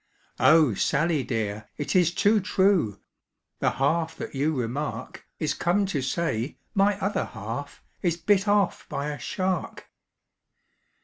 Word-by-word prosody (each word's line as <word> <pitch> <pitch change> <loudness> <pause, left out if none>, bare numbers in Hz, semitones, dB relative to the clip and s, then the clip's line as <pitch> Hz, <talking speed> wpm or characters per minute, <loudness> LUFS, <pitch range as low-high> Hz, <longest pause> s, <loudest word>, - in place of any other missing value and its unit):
"Oh! 155 -6 +6
Sally 150 - +1
dear, 110 -3 -3
it 145 - -3
is 175 -2 +4
too 210 +4 +3
true, 190 - +2 0.6
The - - +2
half 160 +4 0
that - - -6
you 145 +3 0
remark 130 +4 -4
Is - - -1
come 190 +4 +1
to 165 -8 -2
say 135 -3 -2 0.2
my 200 -1 +3
other 200 +1 -1
half 115 +6 -7 0.2
Is 170 -2 +1
bit 200 +3 +2
off 205 -2 +1
by 140 +2 -2
a 145 - -6
shark! 185 -2 -3
160 Hz, 135 wpm, -26 LUFS, 135-190 Hz, 0.6 s, Oh